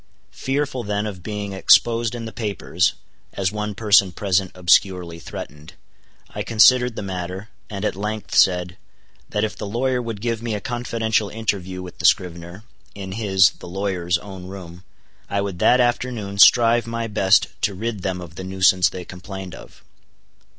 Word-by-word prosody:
Fearful 135 -2 -2
then 105 0 -2
of 100 -4 -6
being 105 0 -5
exposed 115 +4 +3
in 115 -1 -6
the 115 - -6
papers 100 -5 -1 0.4
(as 95 -1 -1
one 105 -1 -4
person 100 -3 +4
present 95 0 0
obscurely 90 -1 +2
threatened) 75 -1 -9 0.6
I - - -4
considered 125 +2 +4
the - - -5
matter, 95 +2 -5 0.2
and 100 -1 -4
at - - -1
length 105 +2 -5
said, 90 0 +3 0.5
that 105 0 -1
if 110 - -2
the 105 - -6
lawyer 125 +4 0
would 115 -3 -5
give 115 0 -2
me 115 -2 -2
a - - -3
confidential 115 -2 -1
interview 95 -4 -3
with 90 - -11
the 85 - -3
scrivener, 90 +1 0 0.3
in 95 -2 -7
his 95 -3 +3
(the - - -10
lawyer's) 90 -2 -1
own 95 0 -10
room, 90 -2 -10 0.5
I 100 - -1
would 100 -3 -3
that 125 - +4
afternoon 120 -5 -1
strive 115 +3 +6
my 115 0 -3
best 105 -2 +3
to 100 - 0
rid 110 0 -4
them 90 -1 -3
of 85 -2 -10
the 95 - -8
nuisance 95 -1 +3
they 90 -1 -8
complained 95 0 -8
of. - - -14
100 Hz, 165 wpm, -22 LUFS, 90-115 Hz, 0.6 s, strive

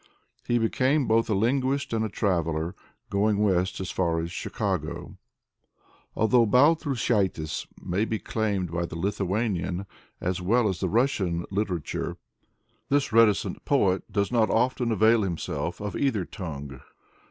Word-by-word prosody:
He 120 - +2
became 130 +5 +1
both 115 +1 +2
a 105 - +2
linguist 130 +5 0
and 110 -1 +1
a 110 - -1
traveler, 85 -4 -1 0.4
going 100 +1 +2
west 95 -3 +1
as 95 -1 -4
far 85 -3 0
as 85 +1 -4
Chicago. - - -3 1.0
Although 115 +2 +4
Baltrushaitis 125 - +2
may 95 +5 -1
be 110 - -2
claimed 100 -6 -2
by 85 0 -1
the 80 - -7
Lithuanian 95 0 -1 0.3
as 90 0 -2
well 110 +5 +3
as 95 -3 -2
the 95 - -1
Russian 95 -7 +1
literature, 95 -5 -2 0.7
this 140 -4 +1
reticent 105 -4 +3
poet 100 -8 +1
does 100 +1 0
not 115 -3 +3
often 125 0 +1
avail 110 +2 +4
himself 90 -5 -3
of 105 0 -4
either 115 -10 0
tongue. 70 - -7
105 Hz, 135 wpm, -26 LUFS, 90-115 Hz, 1.0 s, Although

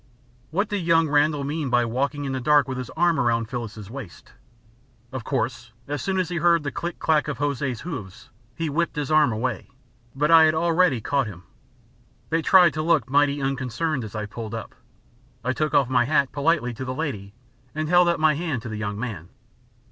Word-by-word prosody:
What 200 +7 0
did 205 -1 -2
young 165 -2 +3
Randall 145 0 +2
mean 145 0 -2
by 120 -1 +3
walking 140 +5 -2
in 135 - -3
the 130 - -2
dark 145 +2 +4
with 130 -1 -4
his 125 - -6
arm 170 -1 +3
round 115 -2 +1
Phyllis's 110 -4 -6
waist? 120 -5 -10 0.8
Of 130 -3 -5
course 120 -2 -3
as 145 0 -3
soon 195 -1 -1
as 180 -3 -1
he 175 - -3
heard 170 -1 +3
the 140 - -3
click 170 0 -5
clack 155 -2 +1
of 150 - -3
Hosea's 140 -4 -2
hoofs 105 - -8 0.2
he 165 - -2
whipped 170 +4 -1
his 150 -1 -3
arm 155 -5 +4
away; 110 +2 -3 0.5
but 150 +4 +1
I 165 -1 +8
had 155 0 +2
already 165 -5 +2
caught 140 +1 0
him. 90 -4 -10 0.9
They 165 +1 +2
tried 180 0 +6
to 155 - -2
look 155 -7 +1
mighty 145 0 +3
unconcerned 135 +2 -2
as 110 0 -8
I 105 -1 -3
pulled 110 +1 -7
up. 115 - -7 0.7
I 130 +2 0
took 155 +1 -1
off 140 -3 +4
my 125 -1 +2
hat 140 -1 +2
politely 145 -4 +1
to 125 - -6
the 130 0 -4
lady 105 -10 -4 0.4
and 155 0 -2
held 175 +1 +5
out 170 - 0
my 155 -1 +4
hand 150 -7 -3
to - - -6
the 110 - -5
young 105 -1 -4
man. 105 -9 -5
140 Hz, 205 wpm, -24 LUFS, 120-160 Hz, 0.9 s, I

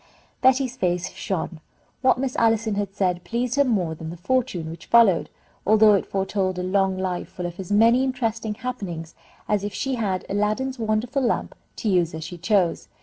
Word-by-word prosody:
Betty's 260 -1 +3
face 180 -5 0
shone. 175 -3 -4 0.4
What 260 - +4
Miss 260 0 -2
Allison 225 -1 +2
had 200 -1 -3
said 180 -2 0
pleased 235 +6 -2
her 280 - +4
more 195 -11 0
than 160 0 -7
the 170 - -7
fortune 195 -5 -1
which 165 - -11
followed, 225 -7 +5 0.3
although 215 +1 +6
it 200 - +1
foretold 190 -1 -1
a 180 - -2
long 190 0 +1
life 185 -1 -3
full 180 - -6
of 175 +1 -6
as 190 0 -6
many 230 +5 +5
interesting 230 -4 -2
happenings 195 -9 -5 0.3
as 210 -2 +1
if 205 0 -4
she 270 0 -1
had 200 -6 -1
Aladdin's 215 +6 -1
wonderful 225 +5 0
lamp 240 - 0 0.2
to - - -4
use 175 -5 +2
as 160 - -6
she 170 +2 -8
chose. 180 -1 +1
205 Hz, 185 wpm, -24 LUFS, 180-235 Hz, 0.4 s, although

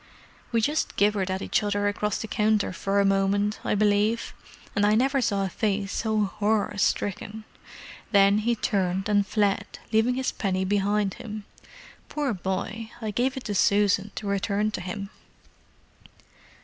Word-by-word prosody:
"We 230 -1 +2
just 300 +7 0
gibbered 200 -2 +2
at 190 +1 -2
each - - +1
other 205 -1 0
across 205 0 -1
the 220 - -5
counter 215 -3 +1
for 200 +2 0
a 200 - +4
moment, 195 +2 +1
I - - 0
believe—and 210 0 -1
I 210 +1 +4
never 265 +4 +2
saw 200 -4 +1
a - - -2
face 200 +1 -1
so 220 -2 +1
horror 205 +1 0
stricken! 205 +2 -1 0.7
Then 200 0 +5
he 235 +2 +1
turned 190 -2 0
and 205 -1 +2
fled, 205 -1 0 0.2
leaving 225 +3 +3
his 260 0 -1
penny 190 -2 -1
behind 205 0 +1
him. 215 -2 -7 0.6
Poor 290 -5 -1
boy—I 215 +4 -4
gave 255 +5 0
it 265 - -5
to 210 - -3
Susan 200 0 +3
to 215 - -5
return 200 +1 0
to 195 - -4
him." 195 +3 -5
205 Hz, 150 wpm, -26 LUFS, 200-220 Hz, 0.7 s, Then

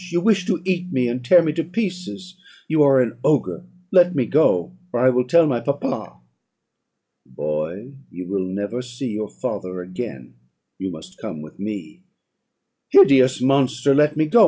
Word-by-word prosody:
you 175 0 0
wish 200 -3 +2
to - - -1
eat 180 -1 -2
me, 125 -2 +1
and 125 +1 -4
tear 175 +8 +6
me 155 - 0
to 165 +1 -1
pieces 185 -1 -5 0.3
You 155 -1 +2
are 135 -2 +5
an 120 -1 -2
ogre 155 +4 0 0.3
Let 180 -2 +5
me 130 -4 +1
go, 145 - +2 0.2
or 120 +1 +1
I - - +7
will 125 0 0
tell 170 +5 +5
my 130 -6 0
papa.' 140 - -4 1.1
"'Boy, 75 - -5 0.2
you 90 +1 -8
will 95 -1 -2
never 100 +6 -4
see 125 +1 -6
your 105 0 -4
father 90 0 -5
again; 90 - -8 0.5
you 95 0 -4
must 80 -1 -12
come 75 - -6
with 75 - -14
me.' 100 - -6 0.9
"'Hideous 130 - +6
monster! 135 0 +2
let 150 +1 +3
me 155 - +3
go. 235 +10 +4
130 Hz, 170 wpm, -21 LUFS, 100-165 Hz, 1.1 s, I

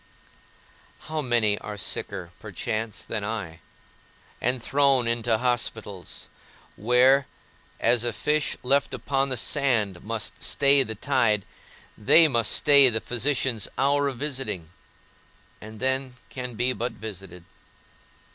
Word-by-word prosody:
How 155 0 -4
many 115 -6 +1
are 105 -1 -8
sicker 100 - -3
(perchance) 110 0 -4
than 105 -2 -4
I, 100 -7 -5 0.8
and 125 +2 0
thrown 135 0 +2
into 115 -1 +1
hospitals, 110 -6 -3 0.5
where 125 +5 +3 0.5
(as 120 0 +3
a 120 - 0
fish 150 +6 -1
left 140 +3 +1
upon 135 0 -1
the 130 - -1
sand 115 - 0
must 110 0 -4
stay 140 0 +4
the 110 -4 -3
tide) 110 -5 +1 0.5
they 160 +10 +6
must 120 -6 +1
stay 140 -2 +7
the 110 -2 -1
physician's 125 -2 -1
hour 140 +1 +2
of 135 -3 -4
visiting, 130 - -4 0.9
and 110 0 -11
then 130 0 -1 0.2
can 125 -2 -6
be 125 +3 0
but 120 0 -4
visited! 95 -5 -9
120 Hz, 120 wpm, -25 LUFS, 110-135 Hz, 0.9 s, stay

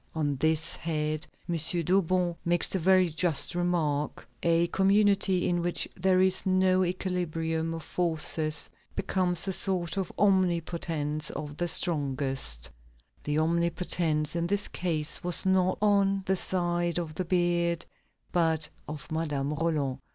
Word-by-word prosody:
On 145 -3 0
this 160 +3 +1
head, 155 -1 -3 0.2
M. 175 - -2 0.3
Dauban 180 0 +1
makes 175 0 +2
the 190 - -1
very 185 +1 +4
just 160 0 +1
remark: 165 -5 -1
"A 170 0 +3
community 195 -1 +3
in 175 -1 0
which 175 0 +2
there 185 0 +2
is 190 0 +3
no 185 -1 +3
equilibrium 165 -3 -2
of 165 - -7
forces, 160 -2 -1 0.3
becomes 185 -2 -1
a 190 - 0
sort 185 -2 +1
of 190 -2 -2
omnipotence 170 -6 0
for 150 -1 -6
the 165 +4 -3
strongest." 135 - 0 0.6
The 150 0 -1
omnipotence 165 -1 0
in 170 0 -1
this 200 +2 -1
case 160 -3 -2
was 180 +1 +3
not 185 -1 +2
on 195 -2 +2
the 190 - +1
side 175 -2 0
of 165 -3 -4
the 185 - -3
beard, 170 -1 +1 0.5
but 160 -3 +1 0.2
of 150 0 -8
Madame 150 -3 -2
Roland. 150 -4 -1
170 Hz, 135 wpm, -28 LUFS, 155-185 Hz, 0.6 s, very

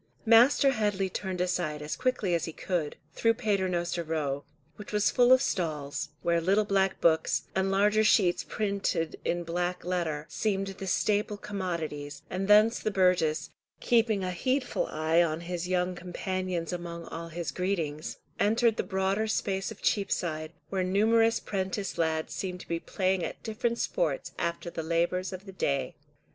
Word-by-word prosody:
Master 245 +5 +6
Headley 205 -5 0
turned 185 -1 -4
aside 175 -4 -1
as 150 - -3
quickly 255 -8 0
as 170 -1 +1
he 165 - -5
could, 170 -5 -2 0.2
through 230 0 +2
Paternoster 180 -5 0
Row, 145 -3 -2 0.3
which 210 - -10
was 210 0 +2
full 245 0 +4
of 260 0 +7
stalls, 150 -5 -2
where 170 0 +2
little 200 +5 +3
black 195 -1 +1
books, 160 -1 +2
and 190 0 +1
larger 210 +2 +3
sheets 185 -4 +4
printed 200 -6 -1
in 175 0 -1
black 175 +2 -2
letter, 165 -5 -1
seemed 195 -3 -1
the 195 0 -7
staple 210 +2 +1
commodities, 165 -8 -4
and 190 +1 -2
thence 215 +3 +6
the - - -1
burgess, 180 -6 +2 0.3
keeping 225 -4 +2
a 185 - -1
heedful 255 +8 0
eye 160 +2 +2
on 165 -1 0
his 175 0 -4
young 180 0 +1
companions 180 -1 -3
among 170 -1 -5
all 165 +1 -6
his 165 +1 -4
greetings, 165 -5 -2 0.2
entered 225 +2 +3
the - - 0
broader 195 +2 0
space 195 -3 -1
of 220 - -11
Cheapside, 165 -6 0 0.2
where 190 -1 0
numerous 225 +4 +3
prentice 190 -1 -3
lads 160 -1 0
seemed 180 -2 -4
to - - -13
be 170 0 -1
playing 185 0 0
at - - -5
different 230 +2 -1
sports - - -1
after 170 0 -2
the 165 - -4
labours 170 +3 0
of 185 +1 -8
the 195 - -8
day. 140 -7 -1
185 Hz, 160 wpm, -29 LUFS, 170-205 Hz, 0.3 s, of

